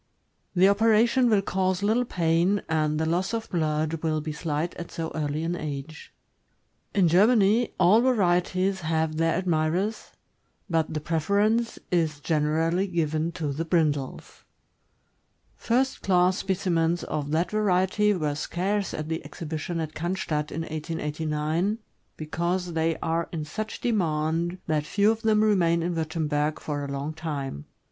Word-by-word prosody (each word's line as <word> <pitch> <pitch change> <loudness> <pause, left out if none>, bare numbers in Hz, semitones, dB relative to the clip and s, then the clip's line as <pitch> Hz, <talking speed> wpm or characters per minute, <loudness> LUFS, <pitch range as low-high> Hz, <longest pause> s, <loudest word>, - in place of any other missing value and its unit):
The 185 +2 +6
operation 225 +4 +4
will 205 -3 +3
cause 185 0 0
little 225 +4 +2
pain, 175 +1 +1
and 155 -1 0
the 160 - +1
loss 180 +7 0
of 225 -1 -5
blood 155 -1 -1
will 155 -1 0
be 155 +1 -4
slight 155 +2 -2
at 170 - -7
so 165 -2 -4
early 150 0 -2
an 170 +1 -1
age. 150 -1 -6 0.8
In 190 -4 +4
Germany, 210 +5 +4
all 190 +5 +6
varieties 190 -5 +1
have 160 -1 -1
their 165 0 +2
admirers, 180 +4 -1 0.6
but 165 -4 0
the 155 -1 -3
preference 200 +9 +1
is 160 -4 +1
generally 160 +5 +1
given 160 -2 -1
to 155 -5 -3
the 155 +4 -2
brindles. 155 -5 -1 1.1
First 260 +3 0
class 180 -1 +3
specimens 175 -3 0
of 145 -1 -3
that 160 +4 0
variety 210 0 +2
were 150 -4 -1
scarce 190 +6 -2
at 155 0 -4
the 160 0 -3
exhibition 165 +1 -5
at 155 -1 -4
Oannstadt, 160 -3 -2
in 165 - -3
1889, 155 +4 -2 0.4
because 170 +3 -2
they 165 0 0
are 165 +1 -1
in 155 -3 -4
such 215 +7 -5
demand 170 -4 0
that 155 -2 0
few 205 +4 +3
of 225 0 -3
them 215 -2 +3
remain 170 -6 +3
in 175 +1 -1
Wurtemberg 155 -2 -1
for 145 -1 -4
a - - -4
long 140 +3 -3
time. 145 - -5
165 Hz, 145 wpm, -26 LUFS, 155-190 Hz, 1.1 s, The